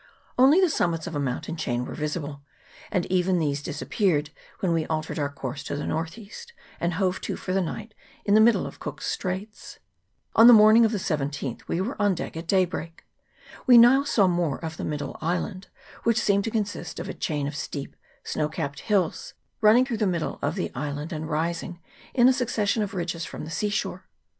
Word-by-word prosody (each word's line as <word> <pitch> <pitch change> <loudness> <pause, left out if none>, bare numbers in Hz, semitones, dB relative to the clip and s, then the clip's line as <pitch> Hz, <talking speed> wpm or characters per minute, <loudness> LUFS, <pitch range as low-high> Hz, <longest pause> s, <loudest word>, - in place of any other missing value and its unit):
Only 270 +7 +6
the 375 - +5
summits 170 - 0
of 170 - -5
a - - 0
mountain 140 +4 -3
chain 125 -6 -2
were - - -7
visible, 150 -2 -4 0.5
and 185 -5 0
even 185 0 +2
these 145 -3 0
disappeared 150 0 -1 0.3
when 180 -3 +1
we 165 -1 0
altered 155 0 -3
our 145 -1 0
course 135 -1 -6
to - - -3
the 145 - -3
north 165 +4 -3
east, 225 - -11 0.3
and 170 0 -1
hove 185 0 0
to - - -3
for 185 - -4
the 195 - +2
night 215 +5 -5 0.3
in 205 - +2
the 215 - +7
middle 230 +1 +4
of - - -9
Cook's - - -6
Straits. 190 +3 -4 0.6
On 225 - +8
the 245 - +11
morning 215 +2 +7
of 220 - +1
the 215 - -1
17th 145 - -3
we 170 - -1
were 240 +8 -3
on 205 -2 +3
deck - - -6
at 165 +1 -6
daybreak. 175 -3 -1 0.6
We 245 -2 +9
now 245 +4 +7
saw 220 -8 +3
more 175 -5 +1
of 160 0 -6
the - - -5
middle 145 -2 -4
island, 185 +3 -2 0.3
which 230 -1 +2
seemed 200 -2 +2
to - - -1
consist 205 -7 -3
of 170 - -5
a 190 - -4
chain 150 -3 -2
of 145 +1 -4
steep 140 -2 -5 0.3
snow 150 -1 -1
capped 140 -2 -4
hills, 195 -6 -1 0.3
running 225 +4 +6
through 240 -4 -3
the 210 -1 +1
middle 170 -3 -2
of - - -1
the 190 - -3
island, 145 +5 -4
and 155 0 -5
rising 170 +2 -2 0.4
in 245 -2 +6
a 260 - +6
succession 230 -4 0
of 205 -1 -3
ridges 170 -2 -3
from - - -7
the 160 - -8
sea 210 +5 -1
shore. 210 - -3
175 Hz, 205 wpm, -25 LUFS, 155-210 Hz, 0.6 s, the